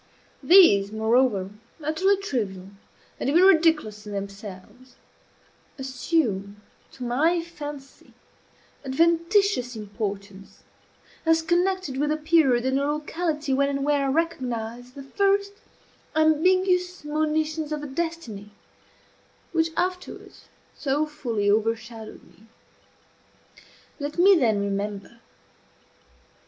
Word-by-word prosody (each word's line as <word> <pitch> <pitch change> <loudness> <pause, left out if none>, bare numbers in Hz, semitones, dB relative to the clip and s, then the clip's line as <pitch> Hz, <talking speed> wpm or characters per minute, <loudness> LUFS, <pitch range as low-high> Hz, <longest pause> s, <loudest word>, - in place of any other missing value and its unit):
These, 205 - +6
moreover, 220 -3 +1 0.3
utterly 370 +7 +2
trivial, 205 - -4 0.5
and - - -1
even 335 +6 +4
ridiculous 315 - +3
in 205 - -6
themselves, 200 +5 -9 0.8
assume 250 - -2 0.3
to 255 - -9
my 315 +8 +1
fancy 295 -5 -10 0.7
adventitious 335 - +1
importance, 200 -2 -7 0.6
as 325 0 +2
connected 350 -3 0
with 295 +2 0
a 310 - 0
period 305 -6 +3
and 265 +1 +1
a 280 - 0
locality 300 -1 -2
when 280 +1 +2
and 275 0 -2
where 290 -1 +1
I - - +1
recognize 245 -6 -3
the 275 - -9
first 400 +6 +1 0.6
ambiguous 360 +3 +2
monitions 310 0 -1
of 300 -1 -3
the - - -6
destiny 270 -9 -5 1.0
which 325 -1 +1
afterwards 365 +1 -4 0.3
so 290 +1 0
fully 245 -9 -3
overshadowed 225 +1 -2
me. 220 - -22 1.5
Let 290 +2 -5
me 385 +3 +6
then 225 - +2
remember. 200 +2 -4
280 Hz, 100 wpm, -25 LUFS, 225-330 Hz, 1.5 s, These